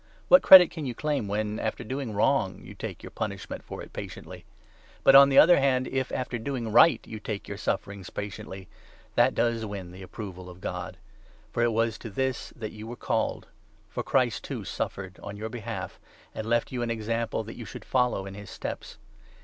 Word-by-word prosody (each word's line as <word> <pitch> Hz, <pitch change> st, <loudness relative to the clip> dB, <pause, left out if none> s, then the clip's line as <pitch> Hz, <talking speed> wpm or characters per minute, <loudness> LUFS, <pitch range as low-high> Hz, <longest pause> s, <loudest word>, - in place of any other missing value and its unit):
What 270 Hz, -, +9 dB
credit 185 Hz, -3 st, +10 dB
can 155 Hz, -4 st, -5 dB
you 120 Hz, -, -4 dB
claim 150 Hz, -8 st, -1 dB
when, 105 Hz, +1 st, -2 dB
after -, -, -3 dB
doing 130 Hz, +4 st, -4 dB
20 105 Hz, -2 st, -5 dB
wrong, -, -, +1 dB
you -, -, -10 dB
take -, -, -7 dB
your -, -, -8 dB
punishment -, -, -5 dB
for -, -, -8 dB
it -, -, -13 dB
patiently? -, -, -8 dB, 0.6 s
But, 135 Hz, -, +7 dB
on 140 Hz, 0 st, +10 dB
the 135 Hz, -, +2 dB
other 175 Hz, 0 st, +8 dB
hand, 130 Hz, -2 st, +2 dB
if, 130 Hz, -1 st, -2 dB
after 125 Hz, -2 st, -3 dB
doing 120 Hz, -2 st, -3 dB
right, 135 Hz, +9 st, +6 dB
you 110 Hz, -, -7 dB
take 105 Hz, -1 st, -5 dB
your 100 Hz, -, -6 dB
sufferings 100 Hz, -2 st, -3 dB
patiently, 95 Hz, -2 st, -7 dB, 0.5 s
that -, -, +3 dB
does 115 Hz, -1 st, +1 dB
win 100 Hz, -4 st, -6 dB
the 95 Hz, +2 st, -11 dB
approval 95 Hz, -2 st, -8 dB
of 90 Hz, 0 st, -12 dB
God. 90 Hz, -1 st, -5 dB, 0.5 s
For 120 Hz, -, -1 dB
it 120 Hz, -, +4 dB
was 115 Hz, 0 st, 0 dB
to 115 Hz, -, -7 dB
21 100 Hz, -, -16 dB
this 130 Hz, -1 st, -1 dB
that 110 Hz, -3 st, -6 dB
you 110 Hz, +1 st, -9 dB
were 120 Hz, -, -6 dB
called! -, -, -1 dB, 0.4 s
For -, -, -3 dB
Christ, -, -, +1 dB
too, -, -, -5 dB
suffered 95 Hz, -1 st, -5 dB
— -, -, -17 dB
on 100 Hz, 0 st, -7 dB
your 110 Hz, +2 st, -5 dB
behalf— 115 Hz, -2 st, -6 dB, 0.3 s
and 110 Hz, -, -5 dB
left 120 Hz, 0 st, +1 dB
you 125 Hz, -2 st, -3 dB
an 120 Hz, -, -1 dB
example, 115 Hz, 0 st, -2 dB
that 110 Hz, +1 st, -9 dB
you 120 Hz, -, -8 dB
should -, -, -9 dB
follow 125 Hz, -6 st, +1 dB
in 95 Hz, -, -7 dB
his 100 Hz, 0 st, -10 dB
steps. -, -, -6 dB
110 Hz, 210 wpm, -27 LUFS, 100-125 Hz, 0.6 s, credit